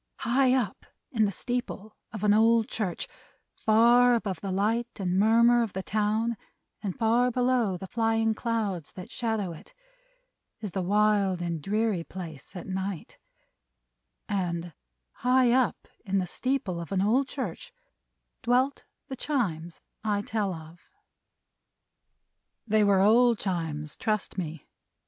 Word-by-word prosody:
High 255 Hz, +2 st, +3 dB
up 230 Hz, -7 st, -2 dB, 0.2 s
in 220 Hz, -4 st, +2 dB
the 200 Hz, -, 0 dB
steeple 230 Hz, -2 st, -4 dB, 0.2 s
of 215 Hz, -2 st, -6 dB
an 205 Hz, -1 st, +5 dB
old 225 Hz, +1 st, +4 dB
church, 195 Hz, -6 st, -3 dB, 0.5 s
far 240 Hz, +3 st, +5 dB
above 200 Hz, -6 st, -3 dB
the 195 Hz, -, -3 dB
light 220 Hz, +5 st, +1 dB
and 185 Hz, -1 st, 0 dB
murmur 235 Hz, +3 st, +5 dB
of 225 Hz, -4 st, -2 dB
the 190 Hz, -, -4 dB
town 215 Hz, +3 st, 0 dB, 0.4 s
and 200 Hz, -4 st, -4 dB
far 235 Hz, +2 st, +3 dB
below 245 Hz, -5 st, +1 dB
the 190 Hz, -, -7 dB
flying 225 Hz, +1 st, +1 dB
clouds 215 Hz, -8 st, -2 dB
that 180 Hz, -, -9 dB
shadow 220 Hz, -6 st, -2 dB
it, 170 Hz, -, -13 dB, 0.8 s
is 210 Hz, -4 st, -5 dB
the 190 Hz, -, -2 dB
wild 200 Hz, -1 st, +2 dB
and 170 Hz, -2 st, -3 dB
dreary 210 Hz, 0 st, 0 dB
place 165 Hz, -3 st, -9 dB
at 180 Hz, -, -6 dB
night: 190 Hz, -2 st, -5 dB, 1.1 s
and 175 Hz, -4 st, -2 dB, 0.4 s
high 250 Hz, 0 st, +3 dB
up 255 Hz, -1 st, +1 dB, 0.2 s
in 195 Hz, 0 st, -1 dB
the 185 Hz, -, +1 dB
steeple 205 Hz, -3 st, -2 dB
of 170 Hz, -, -9 dB
an 195 Hz, -1 st, +1 dB
old 250 Hz, +6 st, +2 dB
church, -, -, -5 dB, 0.7 s
dwelt 255 Hz, +3 st, +1 dB, 0.2 s
the 270 Hz, -, -5 dB
Chimes 180 Hz, -, -2 dB, 0.2 s
I 205 Hz, -2 st, 0 dB
tell 210 Hz, -3 st, -1 dB
of. 160 Hz, 0 st, -10 dB, 1.9 s
They 215 Hz, -1 st, +3 dB
were 200 Hz, -2 st, +4 dB
old 235 Hz, +3 st, +5 dB
Chimes, 160 Hz, -6 st, -3 dB
trust 215 Hz, -2 st, -1 dB
me. 165 Hz, -5 st, -5 dB
210 Hz, 135 wpm, -27 LUFS, 185-235 Hz, 1.9 s, an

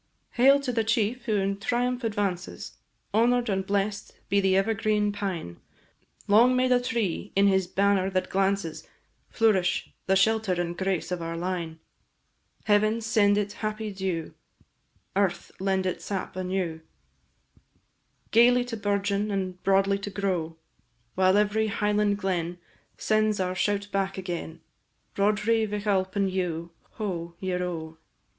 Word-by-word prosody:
Hail 275 Hz, +3 st, +5 dB
to 270 Hz, -3 st, -2 dB
the 225 Hz, -1 st, +1 dB
chief 225 Hz, +2 st, 0 dB
who 220 Hz, -3 st, +1 dB
in 195 Hz, 0 st, 0 dB
triumph 245 Hz, +3 st, -1 dB
advances! 200 Hz, -5 st, -3 dB, 0.4 s
Honour'd 240 Hz, +2 st, +3 dB
and 190 Hz, -1 st, 0 dB
bless'd 200 Hz, +1 st, -2 dB
be 200 Hz, +1 st, +3 dB
the 190 Hz, -1 st, +3 dB
ever 205 Hz, +3 st, +2 dB
green 210 Hz, -1 st, +1 dB
pine! 190 Hz, -, -4 dB, 0.7 s
Long 235 Hz, +5 st, +5 dB
may 255 Hz, 0 st, +3 dB
the 250 Hz, -1 st, +3 dB
tree, 220 Hz, -6 st, -2 dB
in 195 Hz, +1 st, +4 dB
his 190 Hz, -2 st, +3 dB
banner 195 Hz, 0 st, +2 dB
that 185 Hz, -1 st, -2 dB
glances, 195 Hz, -4 st, -1 dB, 0.4 s
Flourish, 200 Hz, -6 st, +1 dB, 0.2 s
the 190 Hz, -, +3 dB
shelter 220 Hz, 0 st, +2 dB
and 175 Hz, -1 st, -2 dB
grace 190 Hz, -1 st, -2 dB
of 180 Hz, -1 st, -2 dB
our 165 Hz, 0 st, -4 dB
line! 170 Hz, -2 st, -3 dB, 0.9 s
Heaven 215 Hz, +2 st, +3 dB
send 210 Hz, -2 st, +3 dB
it 205 Hz, 0 st, -1 dB
happy 215 Hz, -1 st, -4 dB
dew, 190 Hz, -4 st, -3 dB, 0.8 s
Earth 195 Hz, -2 st, 0 dB
lend 190 Hz, 0 st, 0 dB
it 185 Hz, -, -2 dB
sap 195 Hz, -3 st, -4 dB
anew, 185 Hz, -3 st, -2 dB, 1.5 s
Gaily 245 Hz, +2 st, +5 dB
to 240 Hz, -2 st, -5 dB
bourgeon, 205 Hz, 0 st, 0 dB
and 185 Hz, -2 st, -3 dB
broadly 195 Hz, 0 st, +2 dB
to 200 Hz, -, -5 dB
grow, 180 Hz, -5 st, -2 dB, 0.6 s
While 185 Hz, +1 st, +3 dB
every 210 Hz, +1 st, +2 dB
Highland 210 Hz, 0 st, +1 dB
glen 180 Hz, -3 st, -2 dB, 0.4 s
Sends 215 Hz, -1 st, +1 dB
our 185 Hz, -1 st, 0 dB
shout 205 Hz, +2 st, 0 dB
back 195 Hz, 0 st, -1 dB
agen, 175 Hz, -3 st, -5 dB, 0.5 s
Roderigh 215 Hz, +2 st, +2 dB
Vich 205 Hz, 0 st, -4 dB
Alpine 195 Hz, 0 st, +1 dB
dhu, 175 Hz, -3 st, -3 dB, 0.2 s
ho! 170 Hz, -5 st, -4 dB
ieroe! 180 Hz, -4 st, -3 dB
200 Hz, 135 wpm, -27 LUFS, 185-215 Hz, 1.5 s, Hail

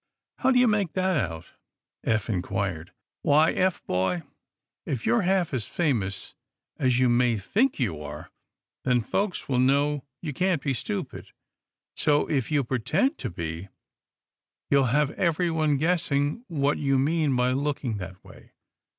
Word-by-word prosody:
"How 260 Hz, -, +2 dB
do 260 Hz, -, +4 dB
you 250 Hz, 0 st, +5 dB
make 205 Hz, -6 st, +1 dB
that 185 Hz, 0 st, +1 dB, 0.2 s
out?" 80 Hz, -1 st, -9 dB, 0.6 s
Eph 110 Hz, -2 st, 0 dB
inquired. 95 Hz, -4 st, -2 dB, 0.3 s
"Why, 155 Hz, +3 st, +4 dB
Eph, 185 Hz, -1 st, 0 dB
boy, 90 Hz, -1 st, 0 dB, 0.6 s
if 125 Hz, -5 st, -4 dB
you're 235 Hz, -, +3 dB
half 185 Hz, -4 st, +1 dB
as 120 Hz, -5 st, -1 dB
famous 110 Hz, -, -1 dB, 0.5 s
as 125 Hz, -2 st, +2 dB
you 130 Hz, 0 st, +4 dB
may 120 Hz, -1 st, +3 dB
think 220 Hz, -, +1 dB
you 90 Hz, -, -1 dB
are, 75 Hz, 0 st, -8 dB, 0.5 s
then 125 Hz, -1 st, +2 dB
folks 195 Hz, -, -2 dB
will 130 Hz, -3 st, +1 dB
know 140 Hz, +2 st, +2 dB, 0.2 s
you 155 Hz, -4 st, -5 dB
can't 180 Hz, 0 st, 0 dB
be 140 Hz, -, 0 dB
stupid. 105 Hz, -4 st, -5 dB, 0.7 s
So, 150 Hz, 0 st, +2 dB
if 135 Hz, -7 st, -1 dB
you 145 Hz, -2 st, +2 dB
pretend 145 Hz, -, 0 dB
to 125 Hz, -, -3 dB
be, 85 Hz, +1 st, -5 dB, 1.0 s
you'll 140 Hz, -1 st, +5 dB
have 140 Hz, +4 st, +2 dB
everyone 160 Hz, -3 st, +1 dB
guessing 155 Hz, -, 0 dB
what 145 Hz, -3 st, 0 dB
you 135 Hz, -2 st, +2 dB
mean 150 Hz, 0 st, +1 dB
by 125 Hz, 0 st, +2 dB
looking 135 Hz, -4 st, -1 dB
that 95 Hz, -1 st, -8 dB
way. -, -, -16 dB
140 Hz, 150 wpm, -26 LUFS, 115-160 Hz, 1.0 s, you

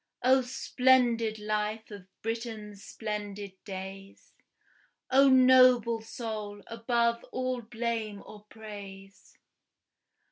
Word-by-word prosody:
O 260 Hz, +1 st, +5 dB
splendid 250 Hz, -3 st, +2 dB
life 215 Hz, +1 st, -3 dB
of 200 Hz, -3 st, -10 dB, 0.2 s
Britain's 220 Hz, -3 st, -5 dB
splendid 205 Hz, -2 st, -5 dB
days! 195 Hz, 0 st, -9 dB, 0.8 s
O 275 Hz, +1 st, +6 dB
noble 255 Hz, -3 st, +6 dB
soul, 215 Hz, -3 st, -6 dB
above 235 Hz, 0 st, 0 dB
all 255 Hz, -1 st, -3 dB
blame 225 Hz, -2 st, -4 dB
or 210 Hz, -1 st, -13 dB
praise! 200 Hz, -3 st, -11 dB
220 Hz, 85 wpm, -29 LUFS, 205-240 Hz, 0.8 s, O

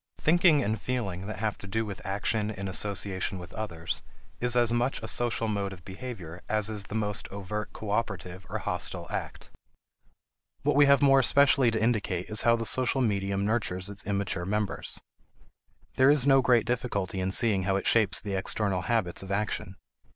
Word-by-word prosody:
Thinking 160 Hz, -2 st, +4 dB
and 110 Hz, 0 st, -2 dB
feeling 100 Hz, -7 st, -3 dB
that 110 Hz, -, -5 dB
have 110 Hz, 0 st, -2 dB
to 100 Hz, -, -7 dB
do 110 Hz, +3 st, -1 dB
with 100 Hz, -2 st, -7 dB
action 105 Hz, +2 st, -1 dB
in 100 Hz, -2 st, -5 dB
association 95 Hz, 0 st, -2 dB
with 90 Hz, -1 st, -10 dB
others 85 Hz, -7 st, -4 dB, 0.4 s
is 125 Hz, 0 st, +1 dB
as 120 Hz, -1 st, +3 dB
much 120 Hz, +3 st, 0 dB
a -, -, -4 dB
social 115 Hz, -2 st, -1 dB
mode 100 Hz, -2 st, -2 dB
of 90 Hz, -3 st, -14 dB
behavior 95 Hz, -5 st, -8 dB
as 110 Hz, 0 st, 0 dB
is 105 Hz, -2 st, -2 dB
the 105 Hz, -, -7 dB
most 105 Hz, -2 st, -2 dB
overt 100 Hz, +2 st, -5 dB
cooperative 100 Hz, -4 st, -4 dB
or -, -, -2 dB
hostile -, -, -2 dB
act. -, -, -5 dB, 1.1 s
What -, -, +2 dB
we 145 Hz, 0 st, +6 dB
have 140 Hz, -1 st, +5 dB
more 135 Hz, -1 st, +6 dB
especially 140 Hz, -1 st, +4 dB
to 110 Hz, -1 st, -1 dB
indicate 105 Hz, -5 st, -1 dB
is 105 Hz, -, +2 dB
how 115 Hz, 0 st, +4 dB
the 115 Hz, 0 st, -3 dB
social 130 Hz, +3 st, +4 dB
medium 100 Hz, -3 st, 0 dB
nurtures 100 Hz, -4 st, -1 dB
its 100 Hz, -, -5 dB
immature 100 Hz, -2 st, -2 dB
members. 105 Hz, +2 st, -2 dB, 1.0 s
There 130 Hz, +1 st, +6 dB
is 145 Hz, -3 st, +4 dB
no 135 Hz, -1 st, +6 dB
great 120 Hz, -3 st, +3 dB
difficulty 115 Hz, -7 st, -2 dB
in 95 Hz, 0 st, -1 dB
seeing 100 Hz, -3 st, +3 dB
how 95 Hz, 0 st, +1 dB
it 100 Hz, -, -2 dB
shapes 110 Hz, -4 st, +3 dB
the 100 Hz, -, -5 dB
external 95 Hz, 0 st, 0 dB
habits 95 Hz, -2 st, 0 dB
of 95 Hz, 0 st, -8 dB
action. 100 Hz, -2 st, -2 dB
105 Hz, 180 wpm, -28 LUFS, 95-120 Hz, 1.1 s, we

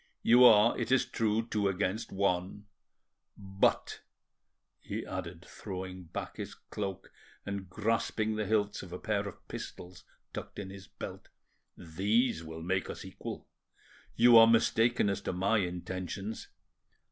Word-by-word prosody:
You 120 Hz, +2 st, +7 dB
are, 110 Hz, 0 st, +7 dB
it -, -, -2 dB
is 130 Hz, -, +4 dB
true, 110 Hz, 0 st, 0 dB
two 105 Hz, -3 st, 0 dB
against 95 Hz, +2 st, -1 dB
one; 95 Hz, +1 st, -1 dB, 0.7 s
but," 95 Hz, -1 st, 0 dB, 0.8 s
he -, -, -5 dB
added, 90 Hz, -1 st, -6 dB
throwing 95 Hz, -2 st, -7 dB
back 80 Hz, -, -6 dB
his -, -, -6 dB
cloak 100 Hz, -3 st, -6 dB, 0.3 s
and 100 Hz, -2 st, -5 dB
grasping 110 Hz, +1 st, 0 dB
the 105 Hz, -1 st, -2 dB
hilts 105 Hz, -1 st, +1 dB
of 95 Hz, -, -10 dB
a 90 Hz, -, -5 dB
pair 100 Hz, +1 st, -1 dB
of 100 Hz, -, -11 dB
pistols 90 Hz, 0 st, -8 dB, 0.3 s
tucked -, -, -7 dB
in 95 Hz, -2 st, -6 dB
his 95 Hz, 0 st, -11 dB
belt, -, -, -9 dB, 0.5 s
"these 95 Hz, +4 st, 0 dB
will 80 Hz, 0 st, -8 dB
make 95 Hz, +2 st, -1 dB
us -, -, -7 dB
equal. -, -, -8 dB, 0.7 s
You 120 Hz, 0 st, +8 dB
are 115 Hz, -, +9 dB
mistaken 115 Hz, 0 st, +3 dB
as 100 Hz, -1 st, -1 dB
to -, -, -3 dB
my 100 Hz, +5 st, +2 dB
intentions. 95 Hz, +3 st, -4 dB
100 Hz, 140 wpm, -31 LUFS, 90-110 Hz, 0.8 s, are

